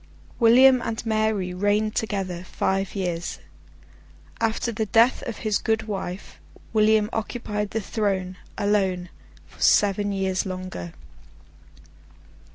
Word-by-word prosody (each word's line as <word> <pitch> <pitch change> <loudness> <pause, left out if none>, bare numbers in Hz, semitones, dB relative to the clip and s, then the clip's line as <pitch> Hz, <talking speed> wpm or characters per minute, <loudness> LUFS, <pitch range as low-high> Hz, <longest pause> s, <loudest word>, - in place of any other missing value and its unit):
William 255 +2 +6
and 230 0 -4
Mary 215 -4 0
reigned 205 +3 +1
together, 195 -6 -2
five 195 +1 -2
years. 175 -3 -3 1.0
After 230 +1 0
the 220 -1 -2
death 230 +4 +4
of 230 - -4
his 210 -2 +2
good 220 0 0
wife, 195 -3 -6 0.3
William 215 -1 +4
occupied 210 -2 -3
the 225 - -2
throne, 190 -3 -2 0.2
alone, 190 -3 0 0.4
for - - -19
seven 205 0 +3
years 190 -1 0
longer. 185 - -6
205 Hz, 110 wpm, -24 LUFS, 190-220 Hz, 1.0 s, William